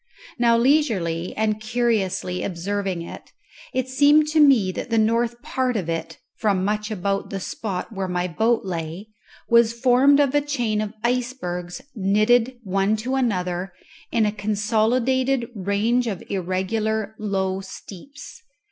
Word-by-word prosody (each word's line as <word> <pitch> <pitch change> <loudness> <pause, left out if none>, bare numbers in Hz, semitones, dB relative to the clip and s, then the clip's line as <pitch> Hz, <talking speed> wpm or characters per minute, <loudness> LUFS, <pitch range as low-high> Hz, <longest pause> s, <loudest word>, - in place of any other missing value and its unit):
Now 235 -1 +4
leisurely 220 - +1
and 215 0 0
curiously 215 -6 -1
observing 190 0 -3
it, - - -10 0.4
it 260 0 -1
seemed 290 +3 +4
to 315 0 +2
me 260 -11 +5
that 215 - -6
the 230 - +1
north 230 +2 +1
part 255 -2 -1
of 175 -5 -3
it, 165 0 -4 0.2
from 195 -4 +1
much 210 +1 -1
about 200 -1 -2
the 195 - -4
spot 195 +1 -5
where 195 -3 -3
my 180 0 -1
boat 220 +7 +1
lay, 170 +3 -5 0.4
was 235 -1 +4
formed 265 +3 +5
of 280 -2 +3
a 290 - +3
chain 240 -7 -1
of 215 +1 -5
icebergs 235 -8 -2
knitted 215 +4 +2
one 195 +1 +1
to 235 +5 -3
another 185 -8 -1 0.4
in 230 -2 +2
a 210 - +1
consolidated 230 +5 +1
range 210 +5 0
of 200 -5 -4
irregular 200 +3 -1
low 190 -2 -1
steeps. 205 - -11
215 Hz, 140 wpm, -23 LUFS, 190-245 Hz, 0.4 s, me